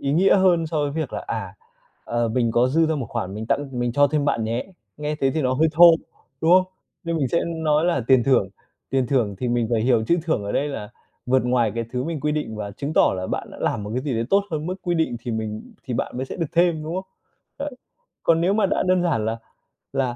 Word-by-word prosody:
ý 140 - -1
nghĩa 185 +7 +5
hơn 180 -4 +3
so 160 - -4
với 145 - -1
việc 155 +2 -3
là - - -5
"À, - - -4 0.5
ờ, 120 0 0
mình 115 0 +1
có 120 +2 +3
dư 160 +4 +3
ra 160 - 0
một 135 -6 -3
khoản, 95 +1 -4
mình 110 +1 -5
tặng 145 +4 0
mình 120 -1 0
cho 145 +3 +5
thêm 145 0 0
bạn 115 -6 0
nhé." 115 +3 -2 0.3
Nghe 150 0 -3
thế 135 - +3
thì 155 +2 -1
nó 130 -1 +1
hơi 160 +5 +3
thô, 170 +1 +8 0.5
đúng 160 - +2
không? 185 +1 +5 0.3
Nên 170 0 -1
mình 140 -5 0
sẽ 170 - +1
nói 160 -2 +1
là 170 -6 +1
tiền 130 -2 +5
thưởng, 125 -8 +3 0.4
tiền 130 -1 +1
thưởng 120 -6 +1
thì 125 - -2
mình 120 -1 +1
phải 115 -2 +2
hiểu 115 -1 +2
chữ 170 +9 +2
thưởng 160 -11 -1
ở 100 - -3
đây 145 - 0
là 105 -7 -6 0.4
vượt 130 0 +2
ngoài 120 -3 +2
cái 115 0 -2
thứ 125 0 -2
mình 165 -2 -3
quy 150 +2 0
định 150 -8 -3
và 105 -1 -5
chứng 140 +9 -5
tỏ - - +4
là 95 0 -3
bạn - - -4
đã - - -11
làm - - -1
một 105 - -6
cái 130 - -1
gì 140 -3 -2
đấy 115 +1 0
tốt 200 0 +4
hơn 155 -1 -3
mức 180 - -2
quy 175 - 0
định 160 -7 0
thì 120 - -5
mình 110 -1 -4
thì 125 - -4
bạn 115 - -3
mới 130 +1 -3
sẽ - - -7
được 165 - -1
thêm, 170 -2 +2
đúng 160 +2 -5
không? 190 +1 -3 0.5
Đấy. 285 +1 -3 0.5
Còn 165 0 +3
nếu 180 +3 +2
mà 210 -1 +3
đã 190 - 0
đơn 185 -1 +3
giản 150 -11 0
là 110 +1 -1 0.6
là 130 -3 0
140 Hz, 270 wpm, -23 LUFS, 120-165 Hz, 0.6 s, thô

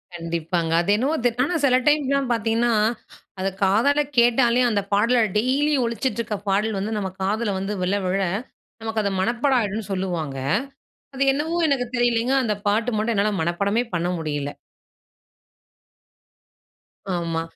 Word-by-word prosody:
கண்டிப்பாங்க. 165 0 -2
அது 175 - -4
என்னமோங்க 250 +2 +1
ஆனா 340 +6 -1
சில 255 -2 +4
டைம்லாம் 275 -3 +2
பார்த்தீங்கன்னா, 230 +1 +1 0.7
அதை 195 +1 0
காதால 230 +10 +3 0.2
கேட்டாலே 240 +1 +4
அந்த 205 -2 +1
பாடல 230 +4 +3 0.2
டெய்லி 275 +6 +1
ஒழிச்சிட்டுருக்கிற 235 -2 -2
பாடல் 210 +2 +1
வந்து 215 +3 -2
நம்ப 195 -2 -2
காதுல 205 +1 0
வந்து 195 +2 -3
விழ 185 - 0
விழ, 185 +2 0 0.6
நமக்கு 225 -1 -2
அது 200 - 0
மனப்பாடம் 245 +5 +2
ஆகிடும்னு 210 0 -3
சொல்லுவாங்க. 175 -7 -3 0.8
அது 270 - -2
என்னவோ 315 +5 -2
எனக்கு 265 -4 +1
தெரியலைங்க, 240 +1 +2
அந்த 215 - 0
பாட்டு 220 +4 +1
மட்டும் 220 +2 0
என்னால 205 +1 +2
மனப்பாடமே 200 +7 0
பண்ண 170 +1 0
முடியல. 145 -3 -3 2.6
ஆமா. 170 -2 -1
220 Hz, 130 wpm, -23 LUFS, 190-245 Hz, 2.6 s, சில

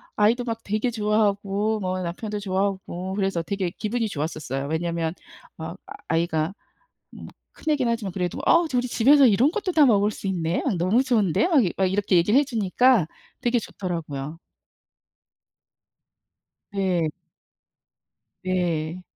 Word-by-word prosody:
아이도 225 +4 +3
막 230 -2 -3
되게 215 +4 -1
좋아하고 210 -1 0
뭐 185 -1 -2
남편도 205 +5 -4
좋아하고 190 -2 -2
그래서 195 -4 0
되게 190 +1 -2
기분이 225 +4 -2
좋았었어요. 145 -4 -4
왜냐면 165 +1 -1 0.4
어 - - -6 0.3
아이가 165 0 0 0.6
뭐 - - -10 0.3
큰 310 - 0
애긴 260 -5 0
하지만 220 -5 -2
그래도 180 -2 -2
"어 335 +1 +5
우리 250 0 +1
집에서 270 +4 +5
이런 245 +6 +4
것도 390 -2 -2
다 305 -3 +6
먹을 210 -4 +3
수 200 - -6
있네? 170 -3 -1
어 - - +2
너무 190 +9 +2
좋은데?" 230 - +2
막 310 -6 +5 0.2
막 190 - +2
이렇게 200 -1 +1
얘기를 205 +10 +4
해 290 - +1
주니까 235 - +3 0.4
되게 240 0 +2
좋더라고요. 165 -7 -5 2.3
네. 185 -5 0 1.4
네. 175 -2 -1
200 Hz, 285 characters per minute, -24 LUFS, 175-230 Hz, 2.3 s, 다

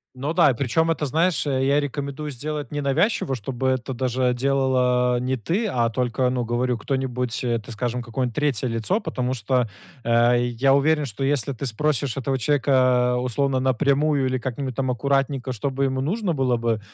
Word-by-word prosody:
Ну 140 +5 -3
да, 170 -5 +6
и - - -1
причем 150 +7 +1
это, 155 -2 -1
знаешь, 160 +2 +1
я 135 +1 +2
рекомендую 145 +1 -4
сделать 150 +2 -5
ненавязчиво, 145 - 0
чтобы 130 +2 -2
это 130 0 -1
даже 125 0 0
делала 125 -2 +2
не 130 +1 -1
ты, 175 - -1
а 120 - +1
только, 125 +1 0
ну, 125 -1 -1
говорю, 120 +1 0
кто-нибудь, 125 -1 -2
э, 120 -2 +1
так 110 +1 -10
скажем, 120 +2 -2
какое-нибудь 120 0 -3
3 140 -4 0
лицо, 115 - 0
потому 125 0 -2
что, 125 +1 0 0.4
э, 120 +1 +4 0.2
я 135 +1 +5
уверен, 150 +1 +2
что 125 +1 -5
если 140 -2 0
ты 130 +2 -5
спросишь 135 +1 -1
этого 135 0 -1
человека, 130 -2 +2
условно, 130 +2 0
напрямую 140 +2 +2
или 130 0 0
как-нибудь 130 0 -4
там 130 -2 0
аккуратненько, 135 0 0
чтобы 135 +3 -1
ему 130 -1 -1
нужно 185 - -1
было 130 -4 +1
бы, 115 -1 0
130 Hz, 175 wpm, -23 LUFS, 125-140 Hz, 0.4 s, да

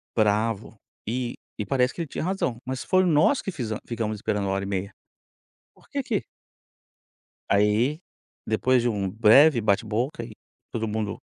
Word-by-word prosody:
bravo, 110 0 +1 0.3
e 120 +2 -2 0.2
e 105 - -3
parece 125 +3 +1
que - - -5
ele 165 - -3
tinha - - -4
razão. 180 -9 -1
Mas 130 0 -4
foi 185 0 +3
nós 170 - +4
que - - -5
fize 120 -10 -4
ficamos 115 -2 -2
esperando 105 -1 -1
1h30. 95 0 -2 0.8
Por - - -24
quê - - -2
que - - -2 1.3
Aí 105 +9 +2 0.5
depois 125 +3 +2
de 120 - +1
um 100 -4 -1
breve 120 +6 +6
bate-boca 110 +7 0
e 115 - -11 0.4
todo 115 -1 -2
mundo 105 -1 -3
115 Hz, 150 wpm, -25 LUFS, 105-130 Hz, 1.3 s, breve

